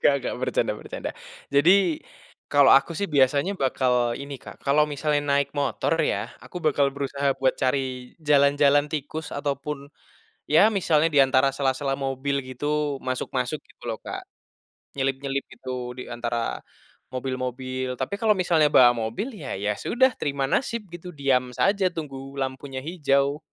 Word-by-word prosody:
Nggak -, -, +5 dB
nggak, -, -, -3 dB
bercanda -, -, 0 dB
bercanda. -, -, -6 dB, 0.4 s
Jadi, 175 Hz, +2 st, +4 dB, 0.5 s
kalau 145 Hz, -1 st, +6 dB
aku 155 Hz, +5 st, +1 dB
sih 200 Hz, +5 st, -2 dB
biasanya 145 Hz, +6 st, +2 dB
bakal 125 Hz, -3 st, +1 dB
ini, 140 Hz, 0 st, -6 dB
Kak, -, -, -13 dB
kalau 145 Hz, +2 st, +3 dB
misalnya 150 Hz, 0 st, -1 dB
naik 140 Hz, 0 st, +2 dB
motor 140 Hz, -5 st, 0 dB
ya, -, -, -1 dB, 0.2 s
aku 180 Hz, -, -7 dB
bakal 140 Hz, -3 st, +2 dB
berusaha 140 Hz, 0 st, 0 dB
buat 130 Hz, -, +2 dB
cari 130 Hz, -2 st, -1 dB
jalan-jalan 145 Hz, -1 st, +4 dB
tikus 155 Hz, +1 st, -4 dB
ataupun 140 Hz, 0 st, -4 dB, 0.6 s
ya 180 Hz, +8 st, +5 dB
misalnya 165 Hz, -7 st, +2 dB
di 145 Hz, -, +5 dB
antara 130 Hz, +1 st, +3 dB
sela-sela 135 Hz, 0 st, 0 dB
mobil 140 Hz, 0 st, -2 dB
gitu, 145 Hz, +2 st, -2 dB
masuk-masuk 130 Hz, +2 st, -2 dB
gitu -, -, -25 dB
loh, 115 Hz, -, -2 dB
Kak. -, -, -5 dB, 0.8 s
Nyelip-nyelip 135 Hz, +1 st, -1 dB
gitu 125 Hz, -1 st, -5 dB
di 125 Hz, -, -7 dB
antara 120 Hz, -1 st, -2 dB, 0.6 s
mobil-mobil. 130 Hz, 0 st, -3 dB
Tapi 200 Hz, -, -3 dB
kalau 215 Hz, -2 st, +3 dB
misalnya 175 Hz, -4 st, +3 dB
bawa 120 Hz, -1 st, +8 dB
mobil 115 Hz, -, -3 dB
ya, 150 Hz, -, -5 dB
ya 105 Hz, +1 st, -2 dB
sudah 260 Hz, +2 st, +3 dB
terima 140 Hz, -2 st, -1 dB
nasib 230 Hz, -7 st, -1 dB
gitu. 175 Hz, 0 st, -9 dB
Diam 125 Hz, -3 st, +1 dB
saja 195 Hz, -, +2 dB
tunggu 135 Hz, -3 st, -7 dB
lampunya 130 Hz, 0 st, -4 dB
hijau. 140 Hz, -3 st, +1 dB
140 Hz, 145 wpm, -25 LUFS, 130-150 Hz, 0.8 s, bawa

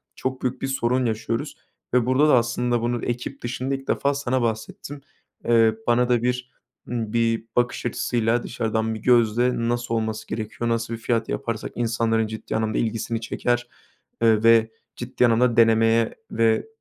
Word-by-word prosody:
çok 130 Hz, 0 st, -4 dB
büyük 130 Hz, 0 st, -2 dB
bir 135 Hz, -, -1 dB
sorun 130 Hz, -1 st, 0 dB
yaşıyoruz 115 Hz, 0 st, -3 dB, 0.4 s
ve 125 Hz, -2 st, +3 dB
burada 130 Hz, +4 st, +3 dB
da 140 Hz, -, +6 dB
aslında 120 Hz, 0 st, 0 dB
bunu 120 Hz, 0 st, -2 dB
ekip 125 Hz, +3 st, -4 dB
dışında 130 Hz, +3 st, -2 dB
ilk 135 Hz, 0 st, -9 dB
defa 140 Hz, 0 st, +1 dB
sana 130 Hz, -2 st, -1 dB
bahsettim. 115 Hz, +5 st, -4 dB, 0.4 s
Eee, 115 Hz, -2 st, +4 dB
bana 120 Hz, +1 st, +3 dB
da 120 Hz, -1 st, +2 dB
bir, 125 Hz, 0 st, -2 dB, 0.4 s
ımm, 115 Hz, -3 st, -3 dB
bir 115 Hz, -1 st, +1 dB
bakış 120 Hz, 0 st, 0 dB
açısıyla 120 Hz, 0 st, 0 dB
dışarıdan 110 Hz, -2 st, -2 dB
bir -, -, -6 dB
gözle 120 Hz, 0 st, +3 dB, 0.2 s
nasıl 120 Hz, -1 st, -2 dB
olması 110 Hz, -1 st, -3 dB
gerekiyor, 115 Hz, +1 st, -4 dB
nasıl 115 Hz, 0 st, -1 dB
bir 115 Hz, -, -5 dB
fiyat 115 Hz, -1 st, -1 dB
yaparsak 115 Hz, -2 st, -3 dB
insanların 115 Hz, -1 st, 0 dB
ciddi 110 Hz, 0 st, -6 dB
anlamda 110 Hz, -1 st, -1 dB
ilgisini 115 Hz, 0 st, -2 dB
çeker, 120 Hz, +1 st, -1 dB, 0.5 s
eee, 110 Hz, -2 st, +4 dB
ve 115 Hz, -1 st, +5 dB, 0.2 s
ciddi 125 Hz, 0 st, 0 dB
anlamda 120 Hz, 0 st, +3 dB
denemeye 115 Hz, 0 st, +4 dB, 0.2 s
ve, 110 Hz, -, +2 dB
115 Hz, 160 wpm, -23 LUFS, 115-125 Hz, 0.5 s, da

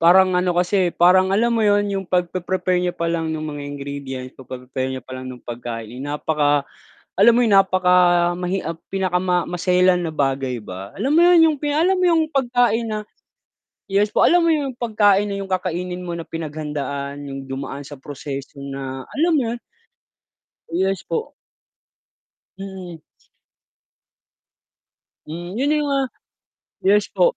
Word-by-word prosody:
parang 185 Hz, +2 st, +6 dB
ano 180 Hz, 0 st, +1 dB
kasi, 180 Hz, +1 st, +2 dB
parang, 185 Hz, +2 st, +5 dB
alam 235 Hz, +4 st, +2 dB
mo 230 Hz, -, +1 dB
'yon 205 Hz, 0 st, +3 dB
'yong 195 Hz, -2 st, -3 dB
pagpe-prepare 180 Hz, 0 st, 0 dB
niya 180 Hz, 0 st, -1 dB
pa 170 Hz, -, -2 dB
lang 165 Hz, -1 st, -1 dB
no'ng 155 Hz, -1 st, -4 dB
mga 145 Hz, -2 st, -5 dB
ingredients, 140 Hz, -2 st, -6 dB
pagpe-prepare 130 Hz, 0 st, -5 dB
niya 130 Hz, -, -7 dB
palang 130 Hz, 0 st, -8 dB
ng 125 Hz, -2 st, -10 dB
pagkain, 120 Hz, 0 st, -6 dB
napaka 145 Hz, 0 st, 0 dB, 0.6 s
alam 235 Hz, +3 st, +8 dB
mo -, -, +4 dB
'yon, 220 Hz, -, +2 dB
napakamahi 180 Hz, -1 st, +3 dB
ah, 165 Hz, 0 st, -3 dB, 0.2 s
pinakama 180 Hz, -2 st, +1 dB
maselan 180 Hz, +1 st, +2 dB
na 160 Hz, -, -4 dB
bagay 135 Hz, -3 st, -1 dB
ba. 95 Hz, +1 st, -8 dB
Alam 270 Hz, -, 0 dB
mo'yon, 350 Hz, 0 st, +7 dB
'yong 310 Hz, -2 st, +1 dB
pi 295 Hz, -1 st, -1 dB
alam 360 Hz, +5 st, +3 dB
mo -, -, +2 dB
'yong 325 Hz, -2 st, +3 dB
pagkain 245 Hz, -4 st, +1 dB
na 215 Hz, -1 st, -2 dB, 0.9 s
yes 205 Hz, +2 st, +2 dB
po, -, -, +4 dB
alam 350 Hz, 0 st, +4 dB
mo -, -, +4 dB
'yong 275 Hz, -5 st, -2 dB
pagkain 210 Hz, -3 st, +3 dB
na 200 Hz, -, -2 dB
'yong 195 Hz, -, -9 dB
kakainin 180 Hz, -1 st, -2 dB
mo 175 Hz, -, -3 dB
na 170 Hz, -, -5 dB
pinaghandaan 150 Hz, -3 st, -4 dB
'yong 135 Hz, -1 st, -7 dB
dumaan 135 Hz, +1 st, -5 dB
sa 145 Hz, -1 st, -10 dB
proseso 140 Hz, 0 st, -7 dB
na, 135 Hz, -1 st, -6 dB
alam 330 Hz, +2 st, +3 dB
mo -, -, +2 dB
'yon? 240 Hz, -, -6 dB, 1.1 s
Yes 190 Hz, +2 st, 0 dB
po. 455 Hz, +1 st, -4 dB, 1.2 s
Mm. 185 Hz, -4 st, -8 dB, 2.2 s
Hmm, 175 Hz, +5 st, -7 dB
'yon 280 Hz, +5 st, +1 dB
'yong 300 Hz, -1 st, +1 dB
mga 275 Hz, -1 st, +1 dB, 0.9 s
yes 205 Hz, 0 st, +4 dB
po. -, -, +3 dB
180 Hz, 150 wpm, -21 LUFS, 145-205 Hz, 2.2 s, alam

